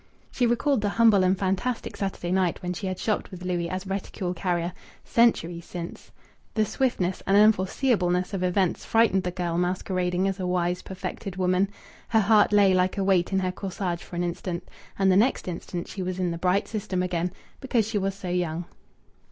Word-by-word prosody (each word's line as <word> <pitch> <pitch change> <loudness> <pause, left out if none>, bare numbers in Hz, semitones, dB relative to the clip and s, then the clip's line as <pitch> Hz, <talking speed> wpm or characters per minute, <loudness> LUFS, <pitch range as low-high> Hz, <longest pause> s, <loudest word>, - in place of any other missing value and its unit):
She 245 - +1
recalled 240 +1 +2
the 205 - +1
humble 220 -3 +5
and 185 +1 +3
fantastic 195 +6 -1
Saturday 195 -3 -3
night 185 -2 +1
when 180 0 -2
she 190 +2 -4
had 185 -1 -3
shopped 215 +1 -1
with 185 -2 -9
Louis 175 -2 -1
as 185 +2 -4
reticule 190 -1 -3
carrier... 175 -1 -1 0.3
centuries 175 -8 +2
since. 175 -1 -7 0.5
The 215 -1 +3
swiftness 195 -8 -1
and 195 +1 +5
unforeseeableness 195 -2 +3
of 195 - -2
events 185 0 +1
frightened 225 -4 +3
the 180 - -2
girl 175 -1 -2
masquerading 180 0 0
as 195 0 -2
a 185 - -2
wise, 180 0 0
perfected 190 0 -6
woman. 185 +1 +2 0.4
Her 225 - +3
heart 210 0 +5
lay 200 -2 +5
like 185 +2 +2
a 195 - +1
weight 190 -2 +2
in 190 - +1
her 185 -1 0
corsage 180 -2 -4
for - - -10
an 175 - 0
instant, 175 0 -4 0.3
and 195 -1 +4
the - - +4
next 230 +1 +2
instant 175 0 -5
she 195 - -6
was 185 0 -3
in 180 -2 0
the 170 - -4
bright 185 +3 +1
system 190 -4 -2
again, 175 -1 -1 0.3
because 240 -5 +1
she 220 -2 -1
was 195 0 -1
so 195 -2 -6
young. 175 -1 -1
185 Hz, 195 wpm, -26 LUFS, 180-200 Hz, 0.5 s, humble